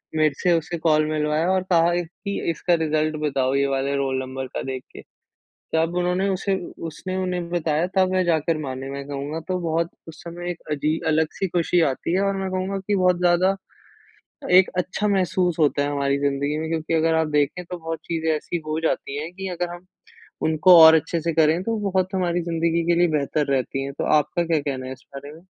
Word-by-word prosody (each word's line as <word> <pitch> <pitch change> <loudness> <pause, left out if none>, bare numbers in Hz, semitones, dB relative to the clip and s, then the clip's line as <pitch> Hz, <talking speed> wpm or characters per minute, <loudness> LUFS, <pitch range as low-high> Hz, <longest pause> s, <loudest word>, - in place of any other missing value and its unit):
मेरे 155 -2 +3
से 180 - +4
उसे 165 +2 -4
कॉल 155 -2 +2
मिलवाया 155 +2 0
और 190 -1 +1
कहा 170 0 +4
एक 175 -1 -1 0.2
कि 200 0 -2
इसका 175 +2 0
रिजल्ट 155 0 0
बताओ 135 -3 0
ये 140 0 +2
वाले 135 +1 -1
रोल 135 -1 -1
नंबर 130 0 -5
का - - -5
देख 130 -1 -5
के। - - -9 0.7
तब 165 +2 +1
उन्होंने 180 +2 +1
उसे 195 +1 0 0.3
उसने 185 +4 -6
उन्हें 180 -2 -2
बताया 165 -1 0
तब 185 -1 +3
वह 185 0 +2
जाकर 165 -2 +1
माने 135 -2 -5
मैं 140 0 -6
कहूँगा 145 +2 -4
तो 185 -1 -1
बहुत 165 0 0 0.2
उस 160 0 -11
समय 175 +1 -6
एक 175 - -9
अजीब 150 +2 -1
अलग 160 0 +2
सी 195 - -2
खुशी 175 0 +1
आती 150 +5 -4
है 190 - +2
और 200 0 +1
मैं 190 0 -2
कहूँगा 185 +1 -2
कि 200 +2 -1
बहुत 180 -2 +3
ज़्यादा, 180 +2 +3 1.0
एक 185 +1 +6
अच्छा 185 +3 -1
महसूस 185 -3 +1
होता 145 -2 +2
है 145 - -1
हमारी 140 -1 0
ज़िंदगी 140 +1 -1
में, 160 0 -3
क्योंकि 165 0 -2
अगर 160 0 +2
आप 160 -1 +1
देखें 150 +4 0
तो 180 +1 -7
बहुत 165 -1 -5
चीज़ें 160 -1 -1
ऐसी 170 +3 -4
हो 155 0 -2
जाती 145 -3 -2
हैं, 165 +3 -7
कि 195 +1 -5
अगर 175 0 -3
हम 175 +1 -13 0.6
उनको 160 +3 +6
और 160 0 +10
अच्छे 165 +1 0
से 165 +1 0
करें 160 +2 +3
तो 225 +3 -1
बहुत 185 0 0
हमारी 175 -2 0
ज़िंदगी 165 0 0
के - - +5
लिए 175 0 +4
बेहतर 145 +1 -1
रहती 135 0 -1
हैं। 140 - -5
तो - - -1
आपका 170 +4 -1
क्या 165 -2 +1
कहना 135 -3 -4
है 130 - -5
इस 130 0 -13
बारे 140 +1 -8
में? 160 +2 -14
165 Hz, 215 wpm, -23 LUFS, 150-180 Hz, 1.0 s, और